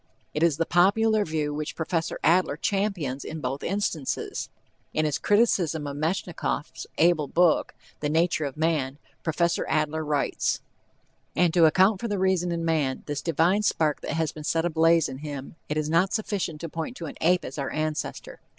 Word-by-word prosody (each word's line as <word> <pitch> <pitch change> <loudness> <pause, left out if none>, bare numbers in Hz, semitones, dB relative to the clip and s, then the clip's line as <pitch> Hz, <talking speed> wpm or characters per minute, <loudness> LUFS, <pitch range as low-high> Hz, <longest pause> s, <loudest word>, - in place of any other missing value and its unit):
It 150 - -2
is 165 -4 +3
the 165 - +1
popular 210 +5 +3
view 155 -4 -2
which 150 +1 -4
Prof. 165 0 -1
Adler 170 -3 +3
champions 180 -9 -1
in 160 - -6
both 135 0 -3
instances. 180 -7 -2 0.5
In 155 - +2
his 150 -2 0
criticism 185 -8 +2
of 140 -1 -4
Metchnikoff's 155 -4 -3
able 160 -3 +3
book, 170 +2 +2 0.2
The 150 - -1
Nature 165 0 +1
of 140 0 -5
Man, 150 -4 0 0.2
Prof. 170 +1 +1
Adler 155 0 0
writes: 150 -2 0 0.8
And 175 -2 +3
to 170 -2 +6
account 190 +5 +4
for 235 - -2
the 205 -2 -1
reason 185 -2 +1
in 165 -1 -2
man, 150 -5 0
this 145 -1 -3
divine 170 +5 +2
spark 155 -7 +1
that - - -4
has 160 0 0
been 155 - -9
set 165 +2 0
ablaze 165 0 +3
in 130 0 -7
him, 145 -1 -7
it 150 - -1
is 155 -1 0
not 170 +5 +2
sufficient 200 -8 -2
to 165 - -4
point 165 +11 -5
to 170 - -6
an - - -6
ape 180 +2 +3
as 135 - -6
our 135 - -2
ancestor. 155 0 -3
160 Hz, 180 wpm, -26 LUFS, 150-175 Hz, 0.8 s, to